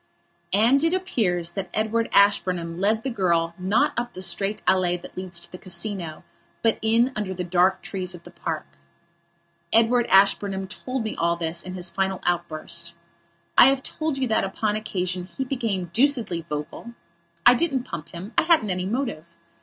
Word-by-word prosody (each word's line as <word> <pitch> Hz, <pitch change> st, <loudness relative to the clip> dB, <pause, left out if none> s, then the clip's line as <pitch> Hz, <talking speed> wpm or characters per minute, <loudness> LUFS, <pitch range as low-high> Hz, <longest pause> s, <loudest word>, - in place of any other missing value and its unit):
And 245 Hz, +8 st, +4 dB
it 330 Hz, +2 st, +3 dB
appears 180 Hz, -, -1 dB
that 190 Hz, -2 st, -5 dB
Edward 220 Hz, +1 st, 0 dB
Ashburnham 180 Hz, -4 st, +3 dB
led 215 Hz, +3 st, +1 dB
the 265 Hz, -, -2 dB
girl 170 Hz, -5 st, +1 dB
not 190 Hz, +4 st, +2 dB
up 240 Hz, 0 st, -3 dB
the 185 Hz, -, -7 dB
straight 195 Hz, +3 st, -1 dB
allée 180 Hz, -2 st, +2 dB
that -, -, -12 dB
leads 180 Hz, -2 st, -3 dB
to -, -, -11 dB
the 180 Hz, -, -9 dB
Casino, 180 Hz, -3 st, -4 dB, 0.4 s
but 225 Hz, -1 st, +2 dB
in 230 Hz, +3 st, +3 dB
under 200 Hz, -3 st, -3 dB
the 180 Hz, -, -3 dB
dark 180 Hz, +2 st, +2 dB
trees 185 Hz, -2 st, -4 dB
of 170 Hz, -, -13 dB
the -, -, -13 dB
park. -, -, -4 dB, 1.1 s
Edward 235 Hz, +2 st, +4 dB
Ashburnham 195 Hz, 0 st, +3 dB
told 255 Hz, +5 st, -4 dB
me 220 Hz, -, -4 dB
all 170 Hz, 0 st, +1 dB
this 170 Hz, 0 st, -3 dB
in 185 Hz, 0 st, -7 dB
his 180 Hz, -1 st, -1 dB
final 190 Hz, -1 st, -1 dB
outburst. 170 Hz, -1 st, -2 dB, 0.6 s
I -, -, +9 dB
have 270 Hz, 0 st, +3 dB
told 310 Hz, -3 st, -3 dB
you 265 Hz, -1 st, 0 dB
that, 220 Hz, -, +2 dB
upon 205 Hz, +2 st, -1 dB
that 215 Hz, -, -1 dB
occasion, 185 Hz, -4 st, -3 dB
he 190 Hz, +9 st, -5 dB
became 220 Hz, -, -2 dB
deucedly 230 Hz, -, +1 dB
vocal. 150 Hz, +10 st, -6 dB, 0.5 s
I 245 Hz, -, +9 dB
didn't 270 Hz, -2 st, 0 dB
pump 170 Hz, -, -7 dB
him. 185 Hz, +6 st, -9 dB
I -, -, +5 dB
hadn't 320 Hz, -, +3 dB
any 180 Hz, 0 st, -2 dB
motive. 235 Hz, -, -2 dB
195 Hz, 175 wpm, -24 LUFS, 175-230 Hz, 1.1 s, I